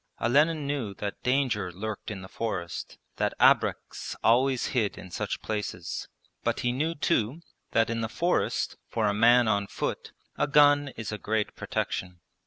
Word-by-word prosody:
Olenin 150 +6 +3
knew 135 -8 -2
that 100 0 -5
danger 125 -8 +1
lurked 105 +4 -5
in 100 -3 -6
the - - -8
forest, 95 -6 -4 0.2
that - - 0
abreks - - +2
always 130 +2 +3
hid 110 -6 +1
in 90 0 -10
such - - -3
places. 105 -5 -4 0.4
But - - 0
he 120 - +1
knew 155 +6 -1
too 145 -2 0 0.3
that 115 - +4
in 115 0 -1
the 110 - -2
forest, 175 +8 0
for 115 -2 0
a 105 - +2
man 120 +3 +5
on 100 -2 +1
foot, - - -4 0.3
a - - +2
gun 145 -1 +5
is 110 -2 -4
a 105 - -4
great 110 0 -1
protection. 90 -1 -3
115 Hz, 165 wpm, -28 LUFS, 105-135 Hz, 0.4 s, man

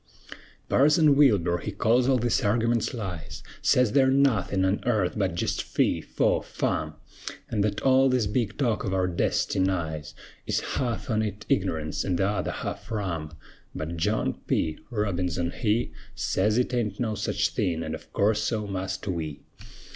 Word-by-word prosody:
Parson 150 +1 +5
Wilbur 100 - +4
he 105 - -4
calls 120 +5 +2
all 130 - +4
these 120 -1 +1
argiments 115 +2 +1
lies; 95 -9 -6 0.2
Sez 125 -4 +3
they're 130 +2 +4
nothin' 120 -9 +2
on 95 +2 +1
airth 105 -7 +1
but 95 -5 0
jest - - -1
fee, - - 0
faw, - - +1
fum; - - -2 0.6
An' 105 - 0
thet 105 0 0
all 135 0 +4
this 125 -3 +2
big 105 0 -1
talk 120 -6 0
of 95 -1 -1
our 95 -1 +1
destinies 85 -3 -1 0.3
Is - - +1
half 120 -3 -2
on 110 0 +2
it 105 -1 -4
ign'ance, 80 -5 0
an' 90 -3 0
t'other 95 0 0
half - - -5
rum; 85 -8 -3 0.4
But 80 +2 -4
John 105 +7 0
P. 80 - 0
Robinson 90 -6 -1
he 115 +2 0 0.2
Sez 105 +4 +1
it 125 0 +1
aint 110 -5 -1
no 115 -3 0
sech 105 0 -3 0.2
thing; 90 -8 -1
an', 80 - -4
of - - -9
course, 105 +1 +2
so 110 -2 -1
must 95 0 -4
we. 80 -6 -3
105 Hz, 160 wpm, -26 LUFS, 90-120 Hz, 0.6 s, Parson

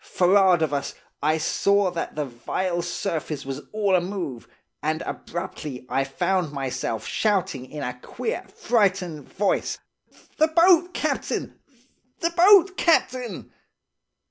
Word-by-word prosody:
Forrard 185 -2 +4
of 150 -2 -1
us, 140 -1 -2 0.3
I 155 +2 +2
saw 200 +4 +2
that 170 -1 -4
the 150 -1 -1
vile 170 +8 -2
surface 160 -4 -3
was 135 0 -5
all 210 -2 0
amove, 175 - -3 0.3
and 155 +2 -1
abruptly 155 -7 -6
I 135 - +1
found 175 +3 0
myself 130 -5 -3
shouting 185 - 0
in 150 -2 -6
a 125 0 -5
queer, 450 - -4
frightened 185 - 0
voice, 200 0 0 0.6
'The 315 - +5
boat, 350 +1 +5
captain! - - -2 0.6
The 335 - 0
boat, 375 +2 +6
captain! 255 -7 0
175 Hz, 120 wpm, -24 LUFS, 145-205 Hz, 0.6 s, boat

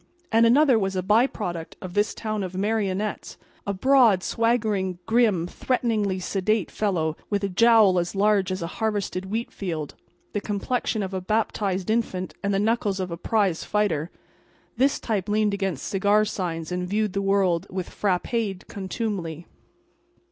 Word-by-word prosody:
And 230 0 +5
another 260 -1 +5
was 195 -1 -1
a 185 - -1
by 215 +7 +4
product 175 -10 -5
of 185 -2 -8
this 205 +2 +1
town 215 -2 -3
of 185 -1 -5
marionettes—a 205 -1 -3
broad, 235 -4 +4
swaggering, 215 -6 0
grim, 220 -7 +3
threateningly 215 -2 -1
sedate 195 +2 0
fellow, 165 -7 0
with 205 -1 -1
a 200 - 0
jowl 215 -2 +5
as 175 +3 -3
large 200 -2 +2
as 185 -2 -3
a 170 - -7
harvested 205 -4 -1
wheat 225 +4 -3
field, 160 -6 -4 0.4
the 205 - -1
complexion 215 +1 -1
of 190 0 -5
a 190 - -2
baptized 200 -1 -1
infant 190 -5 -1
and 200 - 0
the 195 - +1
knuckles 210 -2 0
of 185 -2 -3
a - - -2
prize 190 -1 0
fighter. 175 -7 0 0.7
This 270 +4 +2
type 210 -3 -2
leaned 210 0 +2
against 195 -8 -2
cigar 205 +2 +2
signs 170 -5 -4
and 180 0 -2
viewed 210 -1 0
the 200 - 0
world 195 -2 +1
with 185 -1 -4
frappéd 200 0 -1
contumely. 190 -5 -4
200 Hz, 155 wpm, -25 LUFS, 185-220 Hz, 0.7 s, And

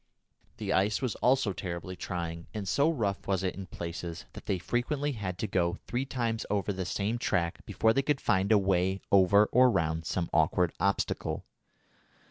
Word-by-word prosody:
The - - -2
ice 100 +3 +2
was 130 -4 -1
also 125 -5 +2
terribly 90 +1 -5
trying, 85 -2 -5
and 105 -2 -4
so 140 - +3
rough 105 -11 -1
was 95 -1 0
it 95 - 0
in 95 -1 -8
places 85 0 -6
that - - -11
they 95 - +1
frequently 135 - -1
had 95 -7 -4
to 105 - -2
go 85 -3 0
three 120 +6 -2
times 115 -4 -2
over 100 0 0
the 95 -1 -3
same 105 +6 -1
track 85 -6 -1
before 110 0 +2
they 135 - +2
could 140 0 0
find 95 +3 +1
a 110 - +7
way 95 -1 +1
over 100 +2 +6
or 125 +1 +6
round 80 -6 0
some 85 -2 -1
awkward 80 +2 +2
obstacle. 100 0 -1
95 Hz, 180 wpm, -30 LUFS, 90-115 Hz, -, a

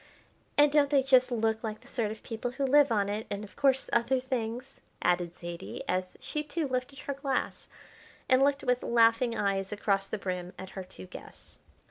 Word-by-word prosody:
"And 290 0 +6
don't 290 -1 +4
they 280 -2 +4
just 255 -1 +5
look 220 -1 0
like 215 -1 -4
the - - -17
sort 230 -5 -1
of 220 +1 -8
people 225 +1 -4
who 270 +3 -2
live 285 0 +5
on 205 -3 +2
it, 210 +2 -3
and, 205 +1 -4
of 210 - -12
course, 270 -2 +2
other 235 +2 +3
things?" 255 0 -4 0.2
added 175 -1 0
Zaidie, 170 0 -7
as 185 0 -1
she 300 - -3
too 300 +1 -2
lifted 255 +1 -3
her 280 - -3
glass, 275 -1 -2 0.6
and 255 0 +5
looked 280 0 +3
with 250 0 +1
laughing 230 0 +3
eyes 195 -1 0
across 200 -1 0
the - - -3
brim 180 -2 -4
at 190 0 -8
her 190 - -6
two 180 - -11
guests. - - -12
235 Hz, 195 wpm, -30 LUFS, 200-270 Hz, 0.6 s, And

